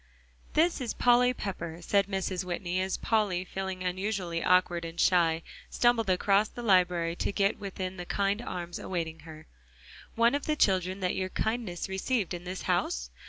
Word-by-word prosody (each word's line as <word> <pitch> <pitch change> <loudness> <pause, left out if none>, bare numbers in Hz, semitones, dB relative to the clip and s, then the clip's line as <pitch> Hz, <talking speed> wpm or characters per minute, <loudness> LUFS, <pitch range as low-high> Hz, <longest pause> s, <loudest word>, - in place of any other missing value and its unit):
"This 330 -1 +2
is 240 - -3
Polly 245 0 +4
Pepper," 170 -8 -5
said 195 +3 +2
Mrs. 190 -2 -2
Whitney, 180 0 -2
as 190 0 -1
Polly, 200 -5 0
feeling 190 0 -4
unusually 180 -2 -2
awkward 180 -2 +3
and 165 +1 -7
shy, 165 -3 +3 0.3
stumbled 240 -4 +2
across 195 +3 +3
the 240 - -9
library 180 -5 +3
to - - -1
get 200 +1 +1
within 190 -2 -5
the 175 - -6
kind 200 +2 0
arms 175 -6 -5
awaiting 165 -3 -4
her. 155 0 -12 0.7
"One 230 +2 +4
of 285 0 -2
the 305 - +2
children 190 -5 +1
that 180 - 0
your 185 0 -2
kindness 220 -4 -2
received 190 +1 -1
in 175 0 -6
this 185 +1 -5
house?" - - -1
185 Hz, 165 wpm, -29 LUFS, 175-205 Hz, 0.7 s, Polly